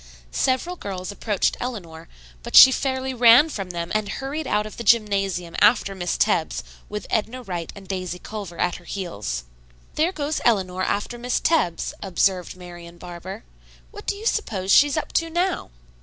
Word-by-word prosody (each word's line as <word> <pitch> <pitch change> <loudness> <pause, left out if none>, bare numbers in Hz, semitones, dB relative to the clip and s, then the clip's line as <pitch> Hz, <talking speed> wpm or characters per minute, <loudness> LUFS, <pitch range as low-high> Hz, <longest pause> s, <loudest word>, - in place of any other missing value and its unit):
Several 260 - 0
girls 190 - -5
approached 205 -1 0
Eleanor, 170 -10 -6 0.3
but - - -5
she 260 - +11
fairly 260 0 -1
ran 245 +5 +7
from 195 -10 -5
them 170 -1 -4
and 215 -2 0
hurried 280 +2 -4
out 210 0 +1
of 215 - -9
the 235 - -5
gymnasium 195 -6 +1
after 210 -3 +4
Miss 180 -2 -2
Tebbs 175 -7 +1 0.3
with 210 0 -5
Edna 230 +3 -1
Wright 175 -6 -5
and 195 -1 -12
Daisy 185 -2 -4
Culver 195 -3 -7
at 180 0 0
her 180 - -17
heels. 105 - -4 0.5
"There 325 +4 +1
goes 305 -3 -2
Eleanor 185 -5 +1
after 205 +5 -2
Miss 245 +1 0
Tebbs," 240 - +1
observed 185 -1 0
Marian 175 -1 -11
Barber. 180 +5 -8 0.5
"What 415 - -11
do - - 0
you 425 +2 -9
suppose 200 - -1
she's 290 +6 +6
up 310 - -3
to 330 0 +1
now?" 350 +3 -1
205 Hz, 170 wpm, -23 LUFS, 180-255 Hz, 0.5 s, she